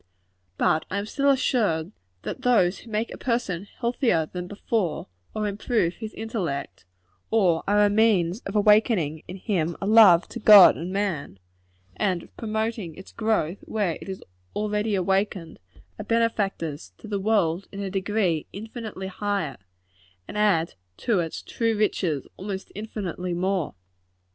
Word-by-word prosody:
But 155 - +2
I 200 - -2
am 200 - -2
still 280 +6 +1
assured, 210 - +1 0.3
that - - -5
those 210 -7 +3
who 235 - -14
make 220 +1 -2
a - - -10
person 210 -7 -2
healthier 235 - +1
than 180 +2 -6
before, 205 -2 -2 0.3
or 215 -1 -1
improve 200 -3 0
his 220 -1 -7
intellect, 170 - -4 0.4
or 185 -7 +2
are 205 +1 +4
a - - +3
means 205 -4 +3
of 195 - -6
awakening 210 -7 +3
in 185 - -7
him 175 -4 -1
a - - -3
love 200 -5 +7
to - - -6
God 205 -3 +9
and 175 +3 -5
man, 190 - -2 0.6
and 180 - 0
of - - -19
promoting 220 -5 -3
its 190 - -12
growth 215 -6 0
where 200 -7 -1
it - - -9
is 190 - -6 0.3
already 210 0 0
awakened, 190 -3 -1 0.4
are - - -4
benefactors 200 -9 -1
to - - -12
the 205 -2 -2
world 195 -4 +1
in 200 - -6
a 195 -1 -4
degree 190 -4 0
infinitely 220 -1 -7
higher, 190 -7 -2 0.7
and - - -8
add 200 -6 +2 0.2
to 220 -6 +1
its 165 -2 -4
true 230 -2 -1
riches 180 -9 0
almost 195 0 -6
infinitely 185 -4 -4
more. 185 -2 -1
200 Hz, 150 wpm, -25 LUFS, 175-220 Hz, 0.7 s, God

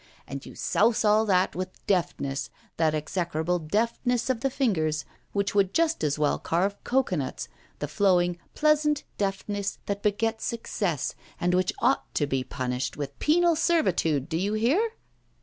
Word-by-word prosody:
And 140 +1 -6
you - - -11
souse 225 +1 +2
all 215 +1 +4
that 185 -2 +2
with 185 +1 -6
deftness, 170 -7 -1 0.3
that 155 -1 +2
execrable 170 +2 -1
deftness 230 +8 0
of 245 - -2
the 270 - +1
fingers 160 - 0 0.3
which 200 -1 0
would 195 -2 +2
just 325 - +2
as 150 -1 +1
well 150 -1 +1
carve 190 +5 0
cocoanuts, 195 - -1 0.3
the - - -3
flowing, 175 -3 +2 0.2
pleasant 300 -1 +3 0.2
deftness 200 0 -2
that 200 0 -2
begets 220 +2 0
success, 200 - -2 0.3
and 175 +1 +1
which 185 0 +2
ought 260 +3 +2
to 145 - +2
be 135 -2 -1
punished 130 0 -3
with 140 -1 -5
penal 340 +2 +4
servitude, 180 - +2
do 165 -1 -1
you 200 +4 0
hear? 320 - +2
195 Hz, 150 wpm, -27 LUFS, 160-235 Hz, 0.3 s, all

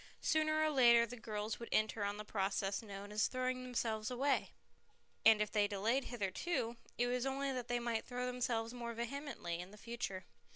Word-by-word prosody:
Sooner 310 -1 +3
or 310 0 +3
later 235 -4 +7
the 240 +2 -7
girls 215 -2 -4
would 235 - -7
enter 215 -1 +2
on 200 0 -1
the 210 - -6
process 195 0 0
known 200 -2 -8
as 210 +1 +2
throwing 255 0 -1
themselves 230 -4 -1
away, 270 +3 +1 0.7
and 220 -1 +8
if 210 - -6
they 210 - +3
had 205 - +2
delayed 225 +7 +1
hitherto, 230 - -2 0.2
it 245 - +3
was 250 +1 0
only 275 +1 -1
that 250 -2 -3
they 245 0 +1
might 235 -2 -1
throw 250 0 -3
themselves 240 -2 -1
more 235 -1 -5
vehemently 235 - -4
in 180 +1 -6
the 210 - -13
future. 210 -5 -4
235 Hz, 195 wpm, -37 LUFS, 210-250 Hz, 0.7 s, and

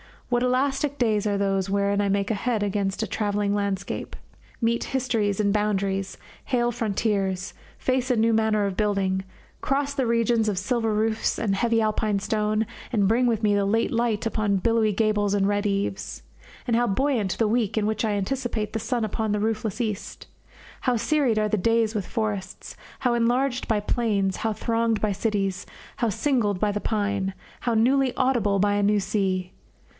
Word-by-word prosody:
What 240 -1 +2
elastic 270 +3 0
days 215 -4 +1
are 205 -1 +1
those 195 -1 0
wherein 200 0 +1
I 200 - +1
make 200 0 0
head 225 0 0
against 200 +1 -1
a - - -2
travelling 205 -1 -1
landscape, 200 -1 -3 0.5
meet 235 0 +1
histories 230 -7 0
and 200 -1 +2
boundaries, 195 -2 -1 0.3
hail 240 -2 +1
frontiers, 200 -4 -1 0.2
face 255 0 0
a 250 - +3
new 225 0 +3
manner 220 -2 +2
of 195 -1 -3
building, 195 -3 0 0.3
cross 280 +1 0
the 270 -3 0
regions 230 -1 +2
of 205 -3 0
silver 225 +4 0
roofs 220 +1 0
and 215 - 0
of 195 - 0
heavy 230 -1 +2
Alpine 215 -1 +1
stone, 215 +2 0 0.3
and 200 -4 +3
bring 245 +3 +3
with 225 -2 0
me 210 -1 +3
the 200 -1 +2
late 225 +3 +1
light 230 -2 0
upon 215 -3 0
billowy 225 +2 +2
gables 210 -1 +1
and 200 -1 +2
red 205 0 0
eaves! 200 -1 -3 0.4
And 235 - +1
how 240 0 +2
buoyant 220 -2 0
the 225 - +2
week 220 -1 0
in 215 - +2
which 215 +1 0
I 215 - 0
anticipate 215 0 -2
the 225 - -1
sun 235 +1 -1
upon 215 0 -1
the 210 - 0
roofless 220 +1 -1
east! 215 -4 -4 0.5
How 250 -2 +1
serried 235 0 +1
are 215 0 +1
the 215 - +1
days 225 +2 +2
with 205 -5 -3
forests, 205 -4 -4 0.2
how 250 -2 +1
enlarged 245 +2 +1
by 215 -2 +1
plains, 205 -4 0
how 220 -1 -1
thronged 230 0 0
by 215 - +1
cities, 195 -2 -1 0.3
how 235 - +1
singled 220 -3 0
by 210 +1 +1
the 205 0 -3
pine, 205 -3 -1 0.3
how 240 - -1
newly 260 +3 +3
audible 240 -7 +2
by 205 +1 +2
a 205 - +1
new 205 0 +3
sea! 190 -2 -1
215 Hz, 180 wpm, -25 LUFS, 200-235 Hz, 0.5 s, a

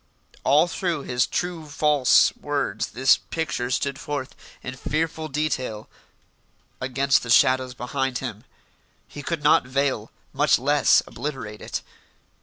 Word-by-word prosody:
All 145 +5 +4
through 170 -4 -2
his 125 0 0
true 175 -3 -3
false 145 -2 +4
words 145 -1 -2
this 130 +2 +3
picture 155 -7 -3
stood 140 +2 -1
forth 140 -3 -4 0.3
in 125 - -5
fearful 160 +3 -2
detail 130 -7 -2 0.9
against 135 +2 +2
the 120 - -8
shadows 130 +1 +4
behind 130 +1 -2
him. - - -6 0.6
He 145 - -9
could 155 +1 -3
not 145 -4 +4
veil, 130 -4 -1 0.2
much 145 +3 +3
less 145 +3 +3
obliterate, 130 -8 -6
it. - - -4
140 Hz, 125 wpm, -24 LUFS, 130-150 Hz, 0.9 s, All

